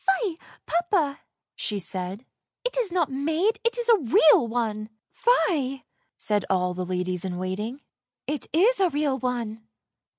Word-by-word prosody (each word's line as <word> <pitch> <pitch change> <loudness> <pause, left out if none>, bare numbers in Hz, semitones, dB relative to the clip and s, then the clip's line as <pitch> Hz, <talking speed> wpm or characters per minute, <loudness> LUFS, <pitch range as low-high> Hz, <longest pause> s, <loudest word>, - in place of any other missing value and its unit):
" 385 +5 +3
Fie, 375 -7 -1 0.3
papa! 340 -4 +1 0.2
" - - -64
she 210 - -2
said; 190 +4 -3 0.2
" - - -63
it - - -1
is 475 -7 0
not 345 -5 +1
made, 320 - 0
it 465 +1 +1
is 480 -1 -2
a 460 -2 +7
real 265 -1 +5
one! 220 -2 -2
" - - -63
" - - -57
Fie," 280 - +1 0.3
said 210 -2 0
all 180 -1 +1
the 185 +1 -3
ladies 180 -1 -2
in 180 -2 -3
waiting; 210 +9 -4 0.2
" - - -67
it 290 - -7
is 400 - +4
a 375 -2 +4
real 290 -3 0
one! 235 -3 -3
265 Hz, 185 wpm, -25 LUFS, 210-350 Hz, 0.3 s, a